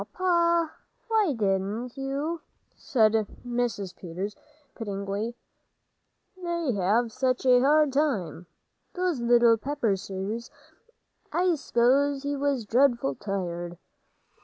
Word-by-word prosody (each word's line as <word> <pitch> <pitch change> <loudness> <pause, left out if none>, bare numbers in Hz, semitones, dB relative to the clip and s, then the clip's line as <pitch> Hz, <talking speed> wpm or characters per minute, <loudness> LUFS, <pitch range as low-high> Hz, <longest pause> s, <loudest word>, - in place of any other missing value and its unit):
"Oh, - - -21
Pa, 340 -3 +2 0.4
why 430 -8 +3
didn't 210 +3 -1
you?" 280 +5 -3 0.3
said 220 -5 +2 0.3
Mrs. 240 -6 -2
Peters, 185 +4 -5 0.4
pityingly, 205 +1 -4 1.0
"they 340 -5 -2
have 215 +4 +1
such 255 +1 0
a 250 -1 +6
hard 295 +1 +4
time, 225 - -1 0.5
those 360 -7 0
little 235 -1 +5
Pepperses. 215 -3 -2 0.8
I 360 0 +2
s'pose 275 0 +2
he 285 0 -1
was 275 -4 0
dreadful 235 - +2
tired." 175 -1 -4
245 Hz, 100 wpm, -27 LUFS, 200-285 Hz, 1.0 s, a